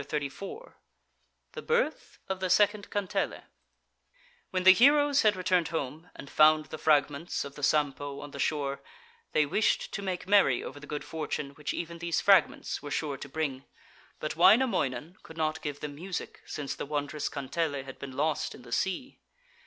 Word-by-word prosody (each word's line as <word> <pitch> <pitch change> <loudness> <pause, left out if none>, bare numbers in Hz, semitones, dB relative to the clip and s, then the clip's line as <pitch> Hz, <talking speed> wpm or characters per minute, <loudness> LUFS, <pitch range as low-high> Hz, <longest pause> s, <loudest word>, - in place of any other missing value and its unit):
THE 195 - -8
BIRTH - - -1
OF 190 -1 -3
THE 190 -1 -1
SECOND 205 +1 +3
KANTELE 205 -2 -2 1.1
When 185 -1 -1
the 190 0 +10
heroes 285 +5 +5
had 210 -2 +4
returned 180 -2 +1
home, 155 +1 -4
and - - -10
found 155 +1 +5
the 155 - -8
fragments 150 +1 +1
of 140 - -8
the 145 - -10
Sampo 145 -1 0
on 145 0 -9
the 140 - -9
shore, 140 -1 -1 0.5
they 155 - +4
wished 210 +9 0
to 200 - -3
make 185 -2 -4
merry 195 -11 +4
over 145 - -8
the 150 - -12
good 150 -1 -4
fortune 150 -2 -4
which 145 0 -5
even 170 0 -5
these 170 0 0
fragments 195 -5 +3
were 145 - -7
sure 145 -1 -2
to 140 - -9
bring, 140 -3 -3 0.5
but 155 - -3
Wainamoinen 175 - +3
could 160 - -13
not 155 0 -1
give 145 -1 -5
them 150 -1 -5
music, 180 +5 -6
since 145 -2 -4
the - - -6
wondrous 145 0 -2
kantele 145 0 -2
had 135 0 -10
been 135 -2 -8
lost 155 +1 0
in - - -14
the 120 - -13
sea. 190 - -2
155 Hz, 170 wpm, -29 LUFS, 145-185 Hz, 1.1 s, the